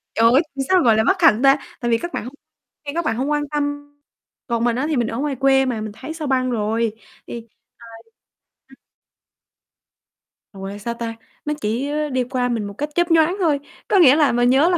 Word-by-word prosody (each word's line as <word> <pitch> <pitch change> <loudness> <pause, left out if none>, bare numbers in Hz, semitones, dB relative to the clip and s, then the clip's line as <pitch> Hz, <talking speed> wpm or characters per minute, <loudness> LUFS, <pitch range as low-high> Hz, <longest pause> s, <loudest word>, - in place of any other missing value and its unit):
Trời 230 +1 +5
ơi, 275 - +6
làm 270 -1 -2
sao 370 -1 +5
gọi 225 -2 +4
là 220 - +3
bất 370 - +1
hạnh 245 -8 +5
ta? 275 +2 +6 0.2
Tại 240 -1 -1
vì 230 - +4
các 345 +7 -6
bạn - - -3
hông 255 - -8 0.5
nghe 285 - -4
các 340 - -1
bạn 225 - 0
hông 275 +4 -1
quan 295 0 +1
tâm, 290 0 -3 0.5
còn 235 -1 -1
mình 240 -1 +1
á 260 +4 -1
thì 305 - 0
mình 235 -2 +1
ở 230 - -4
ngoài 285 -1 -2
quê 270 +1 +3
mà, 235 -4 -2
mình 215 -1 -5
thấy 310 +5 -7
sao 315 -3 -5
băng 255 -1 +1
rồi, 220 0 -1 0.3
thì 230 -1 -8 0.5
ờ, 225 - -12 0.7
ừm. - - -17 1.8
Ủa, 195 -1 -8
là 200 +1 -7
sao 235 +3 -4
ta? 230 -1 -5 0.3
Nó 300 - -1
chỉ 235 +7 -2 0.2
đi 255 -1 0
qua 250 0 -2
mình 230 -3 -1
một 200 - -8
cách 295 +7 -4
chớp 345 -1 +1
nhoáng 325 +3 +4
thôi, 305 -6 +2 0.3
có 395 - +3
nghĩa 285 -4 +7
là 295 -5 +3
mình 245 +1 +2
nhớ 280 +7 +4
là 350 - +2
260 Hz, 230 wpm, -21 LUFS, 230-295 Hz, 1.8 s, nghĩa